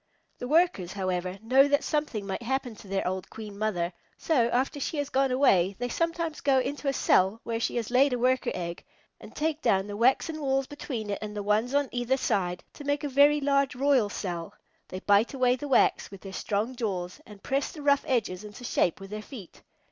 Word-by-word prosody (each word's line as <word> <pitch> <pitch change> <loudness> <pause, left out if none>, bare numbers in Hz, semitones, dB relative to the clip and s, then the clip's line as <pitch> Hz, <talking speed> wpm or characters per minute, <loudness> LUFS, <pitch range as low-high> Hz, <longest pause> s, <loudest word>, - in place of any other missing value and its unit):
The 245 - -4
Workers, 305 - +2
however, 185 -1 -2
know 265 +5 +5
that 285 0 +2
something 295 -9 -2
might 195 +3 -4
happen 250 -1 -2
to - - -13
their 195 -1 -1
old 185 0 -3
Queen 215 -2 -9
Mother, 185 -5 -1 0.2
so, 255 -8 +2
after 260 +4 0
she 295 - -3
has 290 -1 -2
gone 270 0 +2
away, 200 -8 +3
they 245 - -3
sometimes 335 +1 -2
go 275 -2 +3
into 285 +3 -2
a - - +4
cell 195 -5 +2
where 230 -1 -2
she - - -1
has 235 -1 -2
laid 265 +3 +4
a 250 - 0
Worker 255 +2 +1
egg, 170 -1 -5 0.4
and - - -13
take 310 0 -1
down 195 -5 +2
the 205 0 -6
waxen 265 +7 +2
walls 270 -1 +1
between 245 -7 -5
it 200 - -2
and 210 -1 -6
the 205 - -3
ones 215 +6 +1
on 285 -1 +2
either 245 +2 0
side 180 -8 -1
to 290 - -10
make 285 +1 -1
a 290 - -2
very 285 +2 +5
large 275 -1 +1
royal 265 -5 +3
cell. 175 -5 -5 0.3
They 185 +1 -7
bite 205 +6 +3
away 250 -1 +3
the 290 +3 -6
wax 270 - +3
with 195 -1 -11
their 195 -1 -9
strong 215 +6 -2
jaws 185 -7 -4
and 205 -1 -14
press 275 +1 -1
the 300 - -9
rough 280 -1 +3
edges 215 -7 -1
into 210 +4 -10
shape 180 -7 +1
with 195 0 -10
their 215 0 -4
feet. 210 - -11
245 Hz, 215 wpm, -28 LUFS, 200-275 Hz, 0.4 s, know